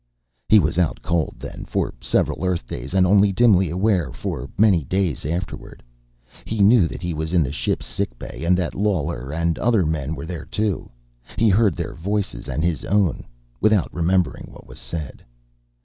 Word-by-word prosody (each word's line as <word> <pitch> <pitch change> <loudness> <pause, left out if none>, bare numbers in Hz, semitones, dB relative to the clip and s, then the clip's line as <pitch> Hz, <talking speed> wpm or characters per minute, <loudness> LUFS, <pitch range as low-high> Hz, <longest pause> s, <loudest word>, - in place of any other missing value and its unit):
He 110 - +8
was 85 -2 +2
out 85 -4 0
cold, 85 -2 0
then, - - -8
for - - -2
several - - 0
Earth 90 -8 -1
days, 65 +8 -6
and 95 -1 +5
only 100 +1 +5
dimly 95 -4 +4
aware 90 - +1
for 65 - -5
many 100 -6 +4
days 90 -2 -1
afterward. 85 +5 -5 0.6
He 110 - -4
knew 100 -3 +6
that 90 - -8
he 85 -1 -2
was 80 +2 -3
in 85 -3 +4
the 65 - -3
ship's 70 -3 -2
sick - - -3
bay, - - -8
and 90 +2 +3
that 90 -2 -2
Lawler 90 -10 -1
and 85 +1 -1
other 115 -7 +2
men 80 -1 -2
were 70 - -6
there, 80 -3 -6
too. 105 +4 -2 0.5
He 115 - +4
heard 100 -3 +3
their - - -4
voices, 95 -9 -3
and 70 +5 -1
his 85 -4 0
own, 100 -5 +1 0.3
without 110 -4 +2
remembering 90 +1 0
what - - -14
was - - -12
said. 80 -5 -6
85 Hz, 180 wpm, -22 LUFS, 80-100 Hz, 0.6 s, He